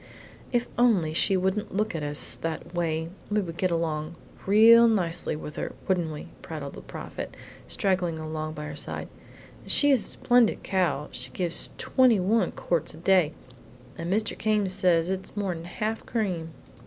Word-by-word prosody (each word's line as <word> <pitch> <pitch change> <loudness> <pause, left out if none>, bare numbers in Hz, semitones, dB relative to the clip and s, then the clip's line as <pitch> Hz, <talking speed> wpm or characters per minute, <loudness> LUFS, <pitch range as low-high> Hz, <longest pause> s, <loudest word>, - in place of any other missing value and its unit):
"If 240 -1 +2
she - - -18
only 195 -11 +3 0.2
wouldn't 190 +3 -1
look 215 +1 0
at 165 - -3
us 145 0 +2
that 165 +1 -5
way 165 -2 -1 0.2
we 210 0 +2
would 170 -5 -4
get 185 - +1
along 165 -1 -2 0.3
real 230 +3 +8
nicely 175 -8 0
with 150 0 -8
her, - - -4
wouldn't 175 -4 +1
we?" 150 - -8
prattled 150 -4 -6
the - - -9
Prophet, - - -8 0.3
straggling 180 -4 0
along 155 0 -4
by 150 - -6
her 150 -1 -6
side; 145 - -4 0.5
"and - - -14
she 290 -1 +5
is 260 -6 +4
a - - 0
splendid 245 -2 +3
cow; 175 -6 0
she 125 +1 -6
gives 170 +5 -1
twenty 255 -5 +3
one 215 +5 +2
quarts 165 -3 -2
a - - -13
day, 175 -2 +3 0.6
and 170 +1 -4
Mr. 215 +2 0
Came 210 -2 +1
says 180 -2 +2
it's 190 +2 -5
more'n 180 -5 -2
half 215 +5 -3
cream." 185 -8 -2
180 Hz, 170 wpm, -27 LUFS, 160-210 Hz, 0.6 s, real